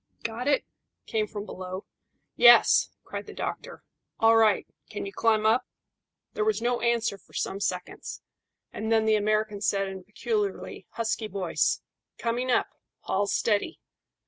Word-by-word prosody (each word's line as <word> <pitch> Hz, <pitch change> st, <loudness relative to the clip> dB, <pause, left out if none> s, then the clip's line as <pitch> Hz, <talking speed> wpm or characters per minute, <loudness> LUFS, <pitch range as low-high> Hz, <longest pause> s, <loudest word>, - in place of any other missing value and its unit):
"Got 230 Hz, +3 st, -3 dB
it?" 290 Hz, -, +2 dB, 0.4 s
came 215 Hz, -1 st, -1 dB
from 205 Hz, 0 st, -6 dB
below. 185 Hz, -1 st, -7 dB, 0.5 s
"Yes," -, -, +7 dB
cried -, -, -7 dB
the -, -, -10 dB
doctor. -, -, -5 dB, 0.4 s
"All 225 Hz, 0 st, +6 dB
right. 220 Hz, -3 st, +4 dB, 0.2 s
Can 205 Hz, -, -5 dB
you 195 Hz, -, -7 dB
climb 220 Hz, -1 st, +2 dB
up?" 225 Hz, +4 st, +3 dB, 0.7 s
There 430 Hz, -, 0 dB
was 435 Hz, 0 st, +1 dB
no 240 Hz, +1 st, 0 dB
answer 235 Hz, -4 st, +1 dB
for -, -, -25 dB
some 195 Hz, -, -2 dB
seconds, 180 Hz, -2 st, -4 dB, 0.5 s
and 220 Hz, +1 st, -3 dB
then 220 Hz, -1 st, +4 dB
the 220 Hz, 0 st, +4 dB
American 215 Hz, 0 st, 0 dB
said, 195 Hz, -1 st, +1 dB
in 190 Hz, 0 st, -6 dB
a -, -, -16 dB
peculiarly 210 Hz, -2 st, -3 dB
husky 225 Hz, -1 st, -1 dB
voice 190 Hz, -4 st, 0 dB, 0.4 s
"Coming 240 Hz, +2 st, -1 dB
up. 245 Hz, -, +2 dB, 0.3 s
Haul 200 Hz, +1 st, 0 dB
steady." 220 Hz, +10 st, 0 dB
215 Hz, 150 wpm, -27 LUFS, 200-230 Hz, 0.7 s, Yes